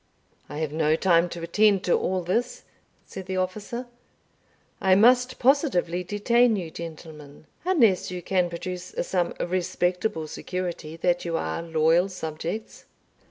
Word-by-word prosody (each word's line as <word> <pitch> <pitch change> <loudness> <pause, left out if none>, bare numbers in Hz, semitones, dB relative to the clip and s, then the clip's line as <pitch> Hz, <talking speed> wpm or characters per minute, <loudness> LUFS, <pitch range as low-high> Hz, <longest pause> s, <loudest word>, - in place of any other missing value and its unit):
"I 145 - -6
have 155 -2 -2
no 155 0 +2
time 175 0 +3
to 170 0 -7
attend 200 +3 +3
to 175 - +2
all 185 -1 -1
this," 230 +8 -1 0.4
said 190 -1 -9
the 190 -1 -2
officer; 205 +7 -3 1.0
"I 190 -1 +5
must 250 +4 +4
positively 240 - +2
detain 225 +5 +2
you, 175 -5 -4
gentlemen, 155 -3 -10 0.2
unless 235 - +3
you 180 -1 -6
can 180 -1 +1
produce 180 +1 -6
some 175 -1 -1
respectable 180 -1 -1
security 170 -2 -5
that 175 +1 +1
you 170 -1 -1
are 80 - -3
loyal 165 +2 +2
subjects." 175 +4 -6
180 Hz, 135 wpm, -25 LUFS, 165-200 Hz, 1.0 s, I